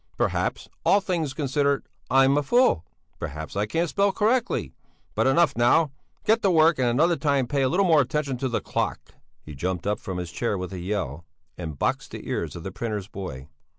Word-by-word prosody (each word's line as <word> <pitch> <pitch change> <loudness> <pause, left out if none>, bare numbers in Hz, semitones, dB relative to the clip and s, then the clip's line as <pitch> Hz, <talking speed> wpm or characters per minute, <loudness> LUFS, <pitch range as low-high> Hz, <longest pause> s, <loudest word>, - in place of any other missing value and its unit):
Perhaps, - - -1 0.2
all 200 - +5
things 170 -8 -2
considered, 140 0 0 0.2
I'm 135 +1 +5
a 145 - +3
fool? 195 - +3 0.4
Perhaps 80 +4 -6
I 100 +1 0
can't 165 +10 0
spell 200 +4 +2
correctly? 220 - 0 0.4
But - - +2
enough, 170 +5 +3
now! 130 +6 +4 0.3
Get 225 +1 +3
to 200 - +3
work 160 -3 +4
and 125 - +2
another 155 +9 +3
time 140 -5 +1
pay 140 +3 -1
a 130 - +3
little 195 +6 +2
more 160 -4 +5
attention 140 0 -1
to 130 +1 -2
the 120 - -1
clock." - - -3 0.3
He 75 - -9
jumped 90 +5 -3
up 105 0 0
from 95 -2 -5
his 90 -2 -5
chair 105 +3 -1
with 90 +1 -5
a 90 - -5
yell, 85 -5 -3 0.3
and 80 -5 -6
boxed - - -1
the - - -9
ears - - -3
of 85 - -7
the 95 - -5
printer's 105 -1 -4
boy. 70 -11 -7
130 Hz, 200 wpm, -25 LUFS, -, 0.4 s, all